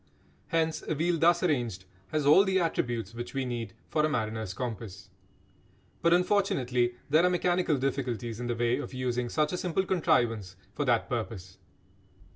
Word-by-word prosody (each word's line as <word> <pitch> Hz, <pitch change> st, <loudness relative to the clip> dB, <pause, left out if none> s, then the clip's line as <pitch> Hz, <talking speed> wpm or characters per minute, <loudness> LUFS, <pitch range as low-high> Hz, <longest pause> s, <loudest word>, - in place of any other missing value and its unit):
Hence 160 Hz, -1 st, 0 dB
a 155 Hz, -, 0 dB
wheel 165 Hz, +2 st, +1 dB
thus 175 Hz, +2 st, +4 dB
arranged 120 Hz, -, 0 dB, 0.2 s
has 155 Hz, -2 st, -1 dB
all 150 Hz, +7 st, +7 dB
the 190 Hz, -1 st, +2 dB
attributes 120 Hz, -, -1 dB
which 120 Hz, +3 st, -7 dB
we 135 Hz, -1 st, 0 dB
need 115 Hz, -5 st, -4 dB
for 155 Hz, -, +1 dB
a 155 Hz, -, +3 dB
mariner's 110 Hz, -6 st, -2 dB
compass. 105 Hz, -6 st, -6 dB, 0.9 s
But 170 Hz, -, +3 dB
unfortunately 135 Hz, -10 st, +2 dB
there 155 Hz, +4 st, +4 dB
are 180 Hz, -, +5 dB
mechanical 175 Hz, -3 st, +1 dB
difficulties 125 Hz, -4 st, -2 dB
in 125 Hz, -, -3 dB
the 120 Hz, -, -1 dB
way 120 Hz, +2 st, +1 dB
of 140 Hz, -, -6 dB
using 125 Hz, -1 st, -1 dB
such 150 Hz, +5 st, 0 dB
a -, -, -1 dB
simple 180 Hz, +1 st, -1 dB
contrivance 115 Hz, -, +1 dB, 0.2 s
for 145 Hz, -, -2 dB
that 120 Hz, -3 st, +2 dB
purpose. 100 Hz, -6 st, -5 dB
125 Hz, 165 wpm, -29 LUFS, 115-165 Hz, 0.9 s, all